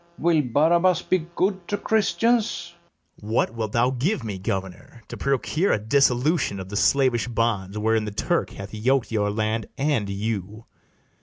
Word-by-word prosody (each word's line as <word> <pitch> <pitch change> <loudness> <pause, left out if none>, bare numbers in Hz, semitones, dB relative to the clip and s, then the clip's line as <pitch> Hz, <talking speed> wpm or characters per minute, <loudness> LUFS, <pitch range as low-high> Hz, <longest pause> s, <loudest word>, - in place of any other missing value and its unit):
Will 165 -1 +3
Barabas 170 +7 +2
be 175 -3 0
good 190 -2 0
to 205 - -1
Christians? 225 +2 +1 0.5
BARABAS. 105 +2 -6
What 115 - +1
wilt 110 -3 -4
thou 120 +2 +3
give 135 - -1
me, 100 -4 -5
governor, 95 +4 -5
to - - -6
procure 140 +7 0
A - - +2
dissolution 125 - +1
of 95 0 -7
the 100 - -6
slavish 125 +3 +2
bands 110 -4 -1
Wherein 110 0 +1
the 105 - -4
Turk 100 - -1
hath 100 +1 -9
yok'd 125 +4 0
your 105 -2 +1
land 110 +1 -1
and 135 -8 0
you? 105 +1 -4
115 Hz, 160 wpm, -24 LUFS, 105-155 Hz, 0.5 s, Will